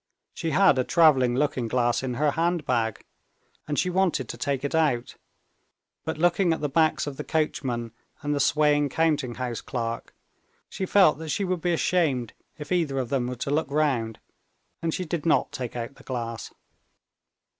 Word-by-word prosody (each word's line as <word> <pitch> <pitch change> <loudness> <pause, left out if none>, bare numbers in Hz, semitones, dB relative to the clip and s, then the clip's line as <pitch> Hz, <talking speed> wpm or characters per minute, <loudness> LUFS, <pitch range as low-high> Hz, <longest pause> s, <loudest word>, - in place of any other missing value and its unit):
She 165 - -3
had 155 -3 +4
a - - +3
traveling 135 -6 +4
looking 130 -3 0
glass 120 +1 +1
in 130 -2 -3
her 150 +3 +2
handbag, 140 - 0 0.6
and 145 -1 -2
she 180 - +1
wanted 190 -1 +1
to - - -4
take 140 -3 -2
it 140 - -2
out; 145 -7 +1 0.9
but 160 0 -3
looking 175 +2 +3
at 160 - -3
the 150 - -1
backs 155 +1 +2
of 145 -2 -6
the - - -4
coachman 130 -7 -1 0.3
and 145 0 0
the 145 - 0
swaying 145 0 +3
counting 150 -6 0
house 125 -2 -4
clerk, 115 -2 -4 0.5
she 190 - -4
felt 185 -7 +5
that 160 -1 -6
she 200 - 0
would 180 -2 -2
be 175 - +1
ashamed 155 -9 +1 0.2
if 150 -1 -9
either 165 -7 +1
of 130 -3 -2
them 130 -3 0
were 125 - -4
to 130 +3 -4
look 150 -1 0
round, 135 -7 0 0.6
and 165 - 0
she 185 - -3
did 160 -2 -3
not 165 - +2
take 130 -5 -5
out 120 +2 -4
the - - -18
glass. 115 -3 -5
145 Hz, 180 wpm, -26 LUFS, 125-160 Hz, 0.9 s, felt